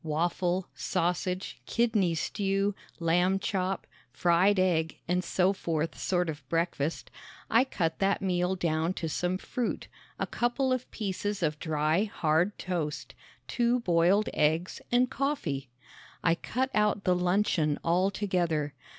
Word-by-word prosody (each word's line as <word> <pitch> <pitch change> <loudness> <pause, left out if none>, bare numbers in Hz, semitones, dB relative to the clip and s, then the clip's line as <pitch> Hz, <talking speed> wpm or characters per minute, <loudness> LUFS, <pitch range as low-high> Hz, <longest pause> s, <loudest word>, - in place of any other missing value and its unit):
waffle, 175 +3 0
sausage, 180 +1 -2
kidney 215 -8 +2
stew, 195 +4 0 0.3
lamb 180 +3 +2
chop, 195 -2 -2 0.3
fried 180 +7 +3
egg 165 -4 +1
and 180 +1 +1
so 185 +2 +2
forth 165 -4 -2
sort 180 -2 0
of 155 -2 -4
breakfast, 165 -2 -1 0.4
I 235 +4 +5
cut 165 -10 -2
that 195 0 +2
meal 180 -1 0
down 165 0 0
to 165 - -3
some 180 +3 -1
fruit, 245 +5 -3 0.3
a - - -1
couple 255 +2 0
of 255 -1 -3
pieces 205 -1 -3
of 150 -1 0
dry, 155 +4 +1
hard 175 0 +1
toast, 165 -5 -3 0.3
two 240 0 +1
boiled 180 +2 +3
eggs 160 +4 +1
and 245 +1 +4
coffee. 250 - -2 0.5
I 165 - +4
cut 255 +9 -2
out 210 -1 +2
the 180 - +3
luncheon 180 -4 +1
altogether. 175 -4 +1
180 Hz, 130 wpm, -29 LUFS, 165-200 Hz, 0.5 s, I